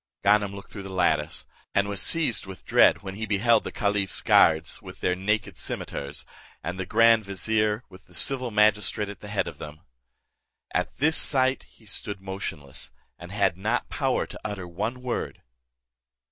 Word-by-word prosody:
Ganem 100 0 +3
looked 100 - -11
through 100 - -7
the 95 - -8
lattice, 80 -5 0 0.3
and 100 0 +3
was 100 -3 -2
seized 155 - +2
with 95 -1 -10
dread, - - +5
when 95 -1 -5
he 110 +2 -4
beheld 110 +4 +3
the - - -5
caliph's 100 -2 0
guards 80 +1 +4
with - - -11
their 90 - +1
naked 105 +3 -1
cimeters, 70 +1 -4 0.4
and 90 +2 -4
the 95 - -3
grand 115 +1 +5
vizier, 105 +3 0
with 95 +1 -16
the 90 - -15
civil 130 - +1
magistrate 105 -1 +2
at 100 - -8
the 105 - -10
head 105 -1 -1
of - - -8
them. 75 0 -9 0.9
At - - -1
this 160 +4 +3
sight 130 -1 +2
he 110 - -21
stood 105 -1 -4
motionless, 95 -8 -6 0.3
and 90 +1 -10
had 100 -3 +1
not 110 +6 -1
power 135 -3 0
to - - -10
utter 100 -4 -5
one 110 +9 -4
word. 125 -2 -3
100 Hz, 175 wpm, -26 LUFS, 95-110 Hz, 0.9 s, dread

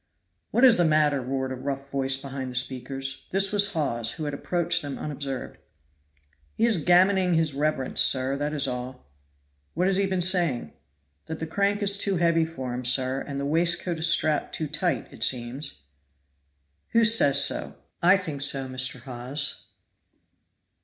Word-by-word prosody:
"What 240 - 0
is 245 -3 +7
the 175 - +3
matter?" 150 -3 +2
roared 130 +1 -3
a - - -3
rough 135 +1 -6
voice 135 -1 +1
behind 135 -1 -6
the 125 - -8
speakers. 135 +1 -3
This 195 +1 +1
was 205 -1 +3
Hawes, 120 -8 0
who 160 - -6
had 145 - -4
approached 175 +4 0
them 145 -2 -6
unobserved. 140 -3 -6 1.0
"He 225 - +1
is 230 -5 +1
gammoning 180 +2 +3
his 160 -3 0
reverence, 145 -2 0
sir 130 +1 +2
that 145 +1 -2
is 145 -3 0
all." 125 - -6 0.7
"What 180 +3 0
has 190 0 +2
he 195 0 +1
been 190 -1 -2
saying?" 170 - +1 0.5
"That 160 - -5
the 160 - -5
crank 200 +5 -1
is 200 0 +3
too 195 -2 +1
heavy 165 -1 +2
for 130 -6 -6
him, 125 +1 -5
sir, 130 +2 +1
and 140 -1 -6
the 140 - -3
waistcoat 170 +2 +1
is 160 - +3
strapped 155 -2 +1
too 160 - -3
tight, 155 +4 -2
it - - -14
seems." 125 - -2 1.1
"Who 230 0 +4
says 145 -11 +5
so?" - - -2 0.3
"I 180 +3 +5
think 155 -7 -5
so, 135 -2 +2
Mr. 130 0 -2
Hawes." 130 +3 -4
145 Hz, 170 wpm, -25 LUFS, 130-175 Hz, 1.1 s, is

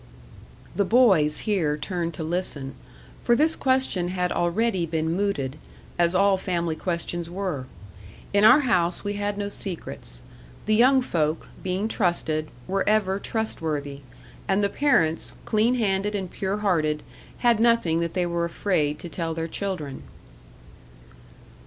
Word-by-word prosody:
The 200 - +2
boys 190 -9 +4
here 165 -9 0
turned 170 0 -3
to - - -4
listen; 155 -5 -3 0.5
for 240 - +4
this 315 +5 +3
question 260 -9 +1
had 180 0 -1
already 180 +1 0
been 160 0 -1
mooted, 155 -8 -1 0.4
as 170 +1 +3
all 195 +1 +4
family 170 -4 -1
questions 170 0 -3
were. 175 -8 -3 0.7
In 200 +1 +4
our 255 +7 +8
house 180 -9 +1
we 205 0 -2
had 205 0 -2
no 205 0 -2
secrets: 175 - -3 0.4
the 215 - +2
young 255 +4 +5
folk, 155 -7 -1
being 190 +3 -1
trusted, 160 -7 0 0.2
were 195 +1 0
ever 200 -2 +2
trustworthy; 155 -11 -3 0.5
and 195 +1 +2
the 200 - +2
parents, 195 - +1
clean 225 +3 +2
handed 205 -2 0
and 190 -3 -4
pure 195 +1 -2
hearted, 155 -7 0 0.4
had 235 -2 +5
nothing 230 -8 +3
that 170 +1 -2
they 180 -1 +1
were 170 0 -1
afraid 165 -4 0
to 175 - -8
tell 165 -1 -3
their 165 0 -2
children. 165 -7 -4
185 Hz, 140 wpm, -25 LUFS, 165-205 Hz, 0.7 s, our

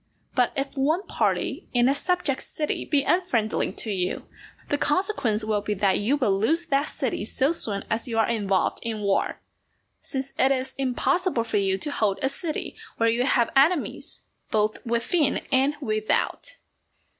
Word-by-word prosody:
But 250 -2 +2
if 275 0 -3
one 310 +8 +1
party - - -1
in 245 0 +4
a 270 - +4
subject 315 -2 0
city 300 -1 -2
be 285 -2 +2
unfriendly 260 -13 +1
to 220 - -2
you, 185 -2 -2 0.4
the 290 - +1
consequence 290 - +1
will 215 -1 0
be 210 0 -2
that 195 0 +2
you 250 +8 +1
will 205 -8 +1
lose 320 +11 +2
that 285 -1 +1
city 250 -6 -2
so 265 +7 +1
soon 205 -11 +1
as 225 +3 -1
you 230 -2 -3
are 225 - +3
involved 200 -5 0
in 225 -2 -4
war, 200 -1 0 0.6
since 270 -1 -4
it 265 - +4
is 265 -1 -1
impossible 275 +3 +1
for 230 - -1
you 195 -1 +1
to 295 +8 -1
hold 210 -7 +1
a 265 - +3
city 310 +3 -4 0.2
where 230 0 +3
you 240 +2 +1
have 240 -4 +2
enemies 295 +4 +2 0.3
both 215 0 0
within 260 +7 +1
and 270 +2 +3
without. 215 - -1
255 Hz, 170 wpm, -25 LUFS, 215-290 Hz, 0.6 s, in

